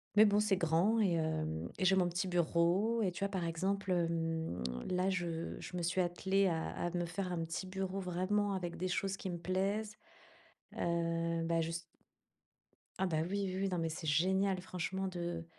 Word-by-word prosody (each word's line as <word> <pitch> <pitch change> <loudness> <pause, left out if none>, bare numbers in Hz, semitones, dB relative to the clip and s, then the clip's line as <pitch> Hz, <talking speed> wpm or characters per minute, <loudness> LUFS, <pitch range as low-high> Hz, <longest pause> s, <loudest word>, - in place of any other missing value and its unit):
Mais 215 +1 +9
bon, 205 0 +4
c'est 210 -3 +3
grand 175 +7 +3
et 190 -5 +3
hem, 80 - -1
et 185 - 0
j'ai 190 +1 +6
mon 180 -2 +3
petit 180 +2 -1
bureau. 175 +6 +2
Et 185 - +1
tu - - -7
vois, 200 - +1
par 185 -4 -2
exemple, 190 +4 -1
hem, 165 - 0 0.3
là 185 +1 +1
je 170 -3 -2
je 180 - -6
me - - -1
suis 180 +2 +2
attelée 190 +3 +2
à 160 -2 -1
à 175 - -2
me 175 -1 -1
faire 180 +2 -3
un 165 -2 -1
petit 165 +3 -4
bureau, 190 0 -3
vraiment 195 +3 0
avec 175 -2 -3
des 185 - -1
choses 190 +2 0
qui 190 - -5
me 175 - -3
plaisent, 200 +5 -1 0.8
heu, 170 0 0
bah 165 0 +2
juste 165 +1 -2 1.2
ah 190 - +2
bah 165 -4 0
oui, 200 0 0
oui 185 0 -3
oui, 195 - +1
non 180 - -1
mais 165 -1 0
c'est 160 0 -5
génial, 190 +5 +2
franchement 185 +1 -3
de 180 -2 -5
heu, 170 -1 -3
180 Hz, 200 wpm, -35 LUFS, 165-190 Hz, 1.2 s, Mais